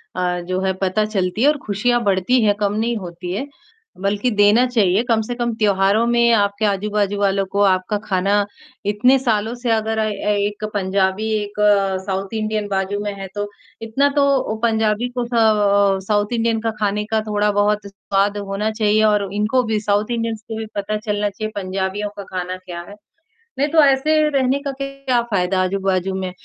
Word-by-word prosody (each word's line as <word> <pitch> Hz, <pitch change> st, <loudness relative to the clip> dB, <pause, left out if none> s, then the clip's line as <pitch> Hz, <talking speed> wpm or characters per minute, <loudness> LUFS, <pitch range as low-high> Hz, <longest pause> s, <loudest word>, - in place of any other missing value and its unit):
अ, 180 Hz, -1 st, -1 dB
जो 185 Hz, 0 st, -1 dB
है 190 Hz, 0 st, 0 dB
पता 210 Hz, +3 st, +1 dB
चलती 200 Hz, 0 st, -2 dB
है 285 Hz, -, +5 dB
और 300 Hz, 0 st, +3 dB
खुशियाँ 240 Hz, +4 st, +1 dB
बढ़ती 200 Hz, +5 st, +2 dB
हैं, 205 Hz, -1 st, +4 dB
कम 205 Hz, -1 st, 0 dB
नहीं 230 Hz, +2 st, -1 dB
होती 175 Hz, -1 st, -7 dB
हैं। 265 Hz, +9 st, -3 dB, 0.5 s
बल्कि 200 Hz, +5 st, 0 dB
देना 210 Hz, +3 st, +4 dB
चाहिए, 210 Hz, -5 st, +2 dB
कम 225 Hz, -2 st, +2 dB
से 240 Hz, +3 st, -4 dB
कम 240 Hz, -1 st, -1 dB
त्योहारों 205 Hz, 0 st, +2 dB
में 235 Hz, 0 st, +3 dB
आपके 200 Hz, 0 st, +1 dB
आजू-बाजू 205 Hz, 0 st, 0 dB
वालों 195 Hz, -1 st, +1 dB
को 200 Hz, +1 st, 0 dB
आपका 190 Hz, +1 st, +2 dB
खाना 200 Hz, +1 st, +1 dB, 0.4 s
इतने 220 Hz, +6 st, +3 dB
सालों 225 Hz, -3 st, 0 dB
से 240 Hz, 0 st, -4 dB
अगर 220 Hz, 0 st, 0 dB
अ 220 Hz, -, +1 dB
अ, 215 Hz, -, -1 dB, 0.3 s
एक 205 Hz, +1 st, -2 dB
पंजाबी, 195 Hz, +1 st, 0 dB
एक 205 Hz, -, -9 dB, 0.5 s
साउथ 195 Hz, +1 st, -3 dB
इंडियन 215 Hz, -1 st, -2 dB
बाजू 195 Hz, 0 st, -1 dB
में 205 Hz, -1 st, -3 dB
है 195 Hz, -, -5 dB
तो, 205 Hz, 0 st, -2 dB, 0.3 s
इतना 245 Hz, +6 st, +1 dB
तो 285 Hz, -, +4 dB, 0.3 s
ओ -, -, -3 dB
पंजाबी 220 Hz, +1 st, +1 dB
को 245 Hz, -, 0 dB
स 240 Hz, -, -9 dB
अ, 200 Hz, -3 st, +3 dB
साउथ 205 Hz, +1 st, +1 dB
इंडियन 230 Hz, -1 st, +1 dB
का 225 Hz, 0 st, -1 dB
खाने 210 Hz, 0 st, 0 dB
का 220 Hz, 0 st, +2 dB
थोड़ा-बहुत 205 Hz, 0 st, +1 dB
स्वाद 200 Hz, +1 st, -1 dB
होना 200 Hz, +2 st, -2 dB
चाहिए 215 Hz, -1 st, +2 dB
और 210 Hz, -2 st, +2 dB
इनको 215 Hz, +5 st, +1 dB
भी 220 Hz, -1 st, -1 dB
साउथ 210 Hz, +2 st, 0 dB
इंडियंस 230 Hz, -2 st, -2 dB
को 225 Hz, -1 st, -5 dB
भी 220 Hz, -, -4 dB
पता 205 Hz, +1 st, -2 dB
चलना 210 Hz, -1 st, -1 dB
चाहिए, 215 Hz, +2 st, -5 dB
पंजाबियों 195 Hz, +1 st, -3 dB
का 200 Hz, -, -5 dB
खाना 180 Hz, 0 st, -3 dB
क्या 175 Hz, -1 st, -6 dB
है? 205 Hz, -, -10 dB, 0.6 s
नहीं 285 Hz, -, +3 dB
तो 315 Hz, 0 st, +5 dB
ऐसे 275 Hz, +2 st, +3 dB, 0.2 s
रहने 270 Hz, -1 st, +1 dB
का 280 Hz, -, -2 dB
क्या 275 Hz, -3 st, -1 dB
फायदा 185 Hz, -1 st, +1 dB
आजू-बाजू 190 Hz, 0 st, -1 dB
में, 190 Hz, -1 st, -3 dB
210 Hz, 190 wpm, -20 LUFS, 195-225 Hz, 0.6 s, है